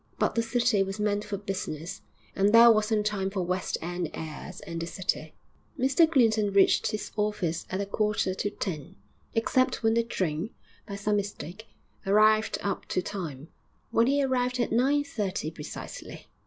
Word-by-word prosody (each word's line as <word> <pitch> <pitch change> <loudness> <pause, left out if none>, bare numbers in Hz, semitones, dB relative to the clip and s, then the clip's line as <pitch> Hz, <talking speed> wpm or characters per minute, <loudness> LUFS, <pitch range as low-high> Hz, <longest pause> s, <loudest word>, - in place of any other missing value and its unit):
But - - +1
the 230 - +2
city 230 -2 +2
was 195 +2 -2
meant 210 0 0
for 210 -1 -4
business, 195 -2 -5 0.3
and 200 +1 +3
there 230 +1 +9
wasn't 215 -1 +2
time 200 -2 0
for 195 -2 -2
West 185 +1 -1
end 175 -1 -3
airs 160 +3 -7
in 165 0 -6
the 165 - -3
city. 185 +1 -3 0.4
Mr 275 +5 +4
Clinton 220 -7 +3
reached 195 -1 +4
his 215 - -4
office 210 -6 -1
at 185 - -2
a - - -1
quarter 210 -2 0
to 205 - -2
ten, 175 -4 -5 0.4
except 250 +3 +1
when 225 0 +4
the 235 - +3
train, 185 -5 -2 0.4
by 200 - -5
some 205 +1 0
mistake, 205 +1 -5 0.4
arrived 215 +2 +4
up 200 -2 -2
to 185 - -1
time, 160 -7 -6 0.4
when 230 +1 +4
he 280 +1 +3
arrived 250 -1 0
at 240 - 0
nine 270 +5 +3
thirty 200 - -3
precisely. 150 -2 -8
205 Hz, 170 wpm, -28 LUFS, 185-225 Hz, 0.4 s, there